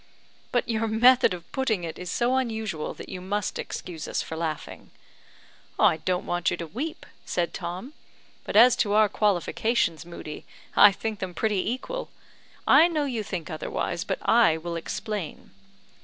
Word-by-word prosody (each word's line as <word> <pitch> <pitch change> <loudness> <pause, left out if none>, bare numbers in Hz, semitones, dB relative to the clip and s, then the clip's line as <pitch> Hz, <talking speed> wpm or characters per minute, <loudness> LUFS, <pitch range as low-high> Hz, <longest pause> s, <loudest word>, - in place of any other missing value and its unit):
"But 245 - +1
your 225 -1 0
method 240 +3 +5
of 175 -2 -7
putting 225 -9 0
it 165 -1 -6
is 180 0 -6
so 240 +6 +1
unusual 220 -10 -2
that - - -9
you 180 - -7
must 205 +2 -2
excuse 165 -4 -6
us - - -2
for 160 - -6
laughing." 160 -2 -5 0.9
"I - - +4
don't 180 +3 -1
want 175 -2 0
you - - -2
to 170 - -5
weep," 265 - -5 0.2
said 175 -1 -1
Tom; 185 - -6 0.5
"but - - -6
as 240 +3 +8
to 205 -2 +1
our 215 0 +6
qualifications, 205 -2 +1
Moodie, 170 -3 -8 0.3
I 205 - +9
think 215 +1 -4
them 185 -2 -5
pretty 210 -3 0
equal. - - -4 0.6
I 330 - +7
know 310 -4 0
you 245 -5 -2
think 180 -5 -5
otherwise, 160 +2 -3
but - - -2
I 225 -9 +5
will 170 +1 -5
explain. 180 +1 -5
205 Hz, 165 wpm, -26 LUFS, 170-230 Hz, 0.9 s, I